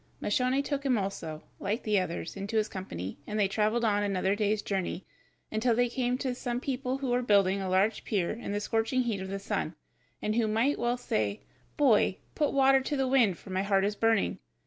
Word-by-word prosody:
Moscione 255 +5 +1
took 280 -1 -2
him 260 -4 +2
also, 165 -6 -4 0.2
like 210 +5 -2
the 210 -2 +2
others, 170 -2 -4
into 200 +3 -3
his 215 0 +2
company, 95 - -6
and 210 +1 -2
they 200 - +4
traveled 215 +4 +1
on 205 -2 +2
another 195 -1 +1
day's 210 0 0
journey, 190 -2 -2 0.5
until 225 +2 +2
they 245 +1 +2
came 250 0 0
to 260 -1 -2
some 245 0 -3
people 260 0 -2
who 270 -2 -2
were 245 +1 +2
building 200 -4 +3
a 190 - -2
large 195 +4 +2
pier 190 -5 0
in 230 -2 -5
the 205 - 0
scorching 225 +4 0
heat 220 -5 -2
of 190 - -5
the 195 - -3
sun, 195 - -3 0.4
and 215 - -1
who 225 -1 +2
might 225 +7 +1
well 240 +1 +1
say, 105 - -1 0.4
"Boy, 230 -9 +4 0.2
put 295 - +1
water 270 -1 +5
to 290 +2 -2
the 265 -1 +1
wind, 240 -9 +3
for 195 - -12
my 185 0 0
heart 195 -1 +2
is 205 +1 -1
burning." 225 -1 +1
215 Hz, 215 wpm, -29 LUFS, 195-250 Hz, 0.5 s, water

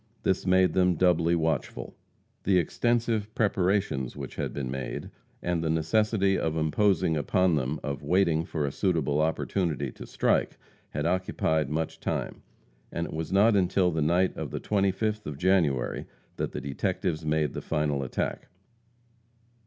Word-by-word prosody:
This 95 0 0
made 95 -2 +4
them 90 -1 +3
doubly 85 -1 +3
watchful. 80 -1 -2 0.5
The 95 -1 +3
extensive 110 +3 0
preparations 95 - +1
which - - -7
had - - -3
been 65 -3 -4
made, 65 0 -5 0.3
and 85 -2 0
the 80 - 0
necessity 95 +5 +2
imposed 80 +4 +1
upon 90 +5 +2
them 75 0 -1
of 70 0 -3
waiting 80 +1 +2
for 80 -3 -2
a 70 - -2
suitable 75 -5 +1
opportunity 80 -3 -1
to - - -10
strike, - - +1 0.3
had 75 +1 -3
occupied 85 -3 0
much 80 +1 -2
time, - - -3 0.5
and 85 - -2
it - - -7
was 80 0 -4
not 105 +3 +5
until 90 -1 +2
the 80 -1 -1
night 85 +5 +2
of - - -4
the - - -4
25th 105 +2 0
of 75 -2 -5
January, 80 -8 +1 0.3
that - - -2
the - - -5
detectives 80 +4 -2
made 75 -1 0
the - - -4
final 75 -3 0
attack. 65 - -3
85 Hz, 150 wpm, -28 LUFS, 75-95 Hz, 0.5 s, not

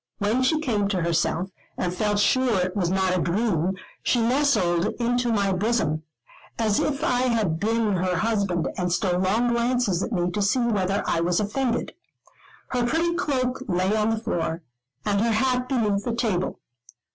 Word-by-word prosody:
When 215 +5 +1
she 305 +5 +2
came 220 -10 0
to 190 -4 -1
herself, 170 +2 0 0.3
and 180 -1 -1
felt 210 +2 0
sure 240 0 +2
it 180 0 -1
was 180 -4 0
not 190 0 +1
a 180 - 0
dream, 180 -1 0 0.3
she 245 - +1
nestled 230 -8 +2
into 245 0 +1
my 200 -3 +1
bosom, 185 -6 0 0.6
as 215 -3 +1
if 295 +1 -1
I 250 -6 +2
had 210 -9 0
been 220 -1 +1
her 180 0 0
husband, 200 -5 0
and 180 -1 -1
stole 180 -1 +1
long 215 +6 +2
glances 235 -5 +1
at - - -3
me 180 -4 0
to 205 - -2
see 200 +5 +2
whether 205 -5 0
I 165 - 0
was 170 +1 +1
offended. 235 +4 -1 0.8
Her 245 -1 0
pretty 325 +7 +1
cloak 260 -7 -1
lay 185 +2 +1
on 215 0 +1
the 225 - 0
floor, 175 -7 -2 0.4
and 205 -1 +1
her 230 0 +2
hat 250 +2 +1
beneath 210 -6 +1
the 235 0 -2
table. 210 -7 -1
210 Hz, 175 wpm, -24 LUFS, 185-240 Hz, 0.8 s, she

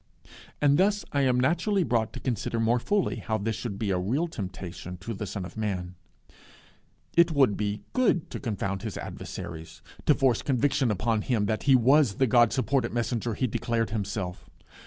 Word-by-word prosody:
And 145 +1 +4
thus 205 +2 +2
I 140 - +1
am 130 -2 +3
naturally 175 +8 +2
brought 115 -4 0
to - - -6
consider 115 -2 -2
more 115 +2 +2
fully 205 - 0
how 110 -2 -2
this 110 +1 -2
should 110 -2 -5
be 105 -2 -1
a 90 - +1
real 130 - 0
temptation 90 - -7
to 95 +6 -6
the 105 0 -5
Son 95 -1 -4
of 90 - -10
Man. 95 -5 -3 1.2
It 170 -1 +5
would 135 -8 +4
be 105 0 -3
good 240 -10 +1
to - - -5
confound 100 -5 -3
his 110 -2 -5
adversaries; 80 -2 -7 0.2
to 150 - +6
force 130 -4 +2
conviction 135 0 +1
upon 110 +2 0
them 105 -1 0
that 110 +1 -1
he 135 - +8
was 130 -2 +4
the 130 - +3
God 120 -1 +4
supported 130 -2 0
messenger 120 -1 -1
he 130 - 0
declared 115 -2 -1
himself. 100 -4 -4
115 Hz, 180 wpm, -27 LUFS, 100-135 Hz, 1.2 s, he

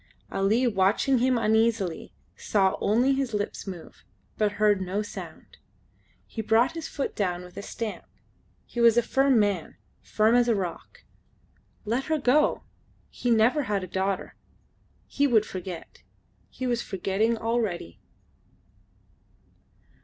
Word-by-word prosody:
Ali 215 +6 +2
watching 220 +5 +2
him 255 0 +2
uneasily 220 -5 +1 0.2
saw 195 -2 +1
only 245 +6 +3
his 265 -5 -1
lips 205 0 -4
move, 180 -4 -9 0.3
but 210 -1 0
heard 210 -2 +2
no 190 +3 -2
sound. 205 - -10 0.7
He 225 - -5
brought 225 +3 +3
his 330 -1 -6
foot 280 - -4
down 180 -3 -1
with 180 0 -14
a - - -5
stamp. 220 +1 -6 0.6
He 240 - -4
was 235 0 +6
a 240 - +4
firm 270 -1 +3
man 200 -6 0 0.3
firm 215 +1 +2
as 245 0 +4
a 230 - +3
rock. 180 -4 -6 0.8
Let 235 +5 -1
her 315 0 0
go. 290 +2 +2 0.5
He 245 - -3
never 235 +6 +4
had 200 -2 0
a - - -6
daughter. 190 +2 -2 0.7
He 285 0 +1
would 220 -5 +3
forget. 185 -3 -8 0.5
He 260 - -6
was 240 -1 0
forgetting 195 +5 -1
already. 220 - -2
220 Hz, 135 wpm, -26 LUFS, 195-240 Hz, 0.8 s, was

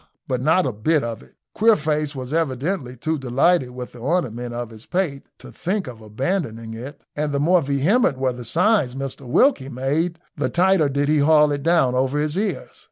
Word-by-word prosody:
But 125 -1 -1
not 160 +7 +3
a 130 - 0
bit 140 +8 +1
of 115 -2 -4
it. 65 - -20 0.2
Queerface 155 -9 +2
was 130 +1 -6
evidently 145 -2 -2
too 155 - -3
much - - -12
delighted 135 +3 +2
with 125 0 -8
the 120 - -13
ornament 125 -4 -1
on 120 -1 -5
his 110 0 -13
pate 175 -7 -2
to - - -12
think 190 +2 -2
of 120 -3 -9
abandoning 115 - -3
it, 125 +6 -8 0.2
and 150 0 -1
the 140 - 0
more 175 +4 +4
vehement 145 - +2
were 130 -1 0
the 125 0 -8
signs 165 - +2
Mr 135 -1 -5
Wilkie 135 - +3
made 145 +7 -1 0.2
the - - -1
tighter 180 -4 +3
did 140 +1 0
he 150 0 +3
haul 150 0 +5
it 145 -1 -2
down 160 -5 +3
over 130 +2 0
his 150 +1 -1
ears. 205 +3 -3
140 Hz, 200 wpm, -22 LUFS, 125-165 Hz, 0.2 s, haul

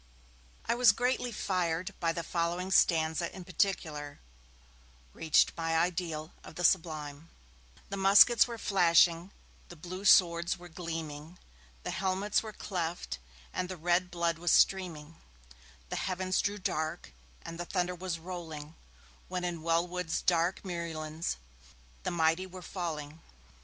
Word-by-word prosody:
I - - +1
was 240 -2 +6
greatly 250 +1 0
fired, 185 -2 -1
and 165 0 0
the 170 - -2
following 175 +3 -2
stanza, 165 -1 +3
in 185 - -8
particular, 155 -5 -2 0.9
reached 160 -2 +3
my 165 0 0
ideal 165 -2 -1
of - - -12
the 180 - -4
Sublime: 155 -3 0 0.6
The 200 - -4
muskets 200 +5 +7
were 235 -1 -6
flashing, 170 -3 +4 0.4
the 175 - -10
blue 180 +4 -8
swords 170 -2 +5
were 175 0 -12
gleaming, 160 -1 -6 0.5
The - - -3
helmets 190 +2 0
were 220 - -7
cleft, 170 - -4 0.3
and 180 - -2
the 185 - -5
red 175 +2 +1
blood 170 -2 -1
was 175 -1 +1
streaming, 165 -5 +2 0.7
The - - -3
heavens 185 0 0
grew 205 +1 -1
dark, 160 - -3 0.3
and 165 0 -8
the 175 - -3
thunder 180 0 -1
was 180 -1 -4
rolling, 160 -3 -7 0.5
When 180 -1 -3
in 175 -2 -3
Wellwood's 170 +1 0
dark 170 +1 +1
muirlands 165 -3 -4 0.7
the - - -2
mighty 165 +2 +1
were 185 0 -10
falling. 160 -4 -5
175 Hz, 135 wpm, -31 LUFS, 165-185 Hz, 0.9 s, muskets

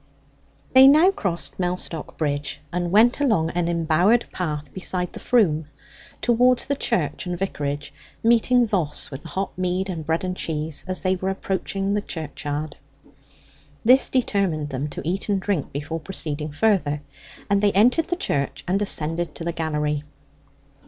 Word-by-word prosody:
They 260 +1 +9
now 310 +7 +7
crossed 190 - -3
Mellstock 180 -3 -3
Bridge, 145 -2 -2
and 175 0 -1
went 225 +8 +4
along 215 - +2
an 175 -1 0
embowered 170 +7 +3
path 150 -5 -4
beside 180 -1 -2
the - - -7
Froom 160 -11 +2 0.5
towards 245 +1 +3
the 280 - 0
church 175 - -1
and 175 0 -2
vicarage, 145 -6 -3 0.3
meeting 235 +2 +4
Voss 175 -11 -1
with 135 +1 -7
the - - -10
hot 190 +6 -3
mead 185 +1 -1
and 165 -4 -4
bread 160 +3 -1
and 185 0 -2
cheese 155 -3 -3
as 185 -1 -1
they 185 0 +1
were 190 +1 -2
approaching 195 +1 -2
the 205 - +1
churchyard. 150 -3 -5 1.1
This 255 +3 +6
determined 195 - 0
them 135 +1 -3
to - - -7
eat 190 +4 -2
and 200 -1 +2
drink 190 -6 -2
before 150 +3 -4
proceeding 155 -4 -5
further, 150 -4 +1 0.4
and 200 -1 +2
they 205 -1 +4
entered 245 - +4
the 350 - 0
church 140 - -2
and 190 +3 +1
ascended 170 -3 -1
to - - -5
the 170 0 -2
gallery. 150 -2 -1
180 Hz, 160 wpm, -23 LUFS, 155-205 Hz, 1.1 s, They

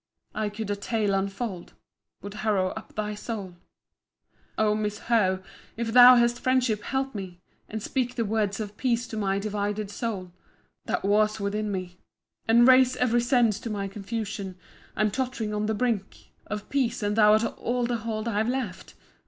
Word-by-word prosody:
[I 215 -1 -1
could 210 0 -5
a - - 0
tale 205 0 -1
unfold—— 195 -1 -3 0.5
Would 205 0 -7
harrow 200 -4 +1
up 220 - -9
thy 210 0 -2
soul——] 205 -3 -6 1.0
O 215 -1 +3
my 215 - -1
Miss 210 0 -2
Howe! 190 -5 +1 0.3
if 225 -1 -2
thou 250 +1 +10
hast 240 0 +3
friendship, 250 -5 +1
help 270 +3 -2
me, 190 -4 -7 0.3
And 215 -1 -5
speak 250 -2 -1
the 230 -2 0
words 205 -1 0
of 210 -1 -6
peace 240 -2 0
to - - -6
my 195 -2 0
divided 205 0 -2
soul, 200 -6 -4 0.5
That - - -2
wars 215 +1 +2
within 210 +1 -2
me, 185 -2 -5 0.5
And 235 +2 +6
raises 255 0 +6
ev'ry 240 -1 +2
sense 240 -4 +2
to 230 - -6
my 200 -2 -2
confusion. 200 -1 -5 0.4
I'm 215 0 +1
tott'ring 245 -3 -2
on 210 0 -1
the 220 - 0
brink 220 -4 -2 0.2
Of 210 0 -5
peace; 245 -5 0
an 205 0 +1
thou 210 -1 +6
art 215 +1 +4 0.2
all 245 0 0
the 240 0 -1
hold 220 0 -4
I've 220 0 0
left! 245 -8 -4
215 Hz, 175 wpm, -26 LUFS, 205-235 Hz, 1.0 s, thou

